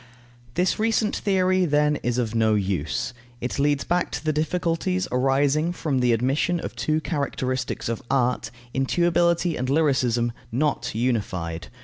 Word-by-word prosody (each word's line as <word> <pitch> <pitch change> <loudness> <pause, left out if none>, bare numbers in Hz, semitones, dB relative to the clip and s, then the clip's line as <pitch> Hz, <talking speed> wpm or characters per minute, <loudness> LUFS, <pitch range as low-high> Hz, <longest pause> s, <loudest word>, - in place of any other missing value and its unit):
This 180 +4 +1
recent 220 -1 +1
theory, 185 -2 +2
then, 150 -2 +2
is 120 -2 -2
of 115 -3 -1
no 110 -1 +3
use. 100 - -1 0.3
It 125 +3 -3
leads 145 0 +2
back 175 +1 0
to - - -4
the 155 - +2
difficulties 175 +3 0
arising 140 +5 +2
from 145 -6 -1
the 125 -1 +3
admission 135 +9 +1
of - - -6
two 155 0 0
characteristics 130 -5 -2
of 115 +2 -2
art, 125 -2 +1 0.2
intuibility 170 +4 +2
and 125 +1 -2
lyricism, 130 -6 +2 0.2
not 145 -1 -1
unified. 95 -9 -2
140 Hz, 140 wpm, -24 LUFS, 120-170 Hz, 0.3 s, no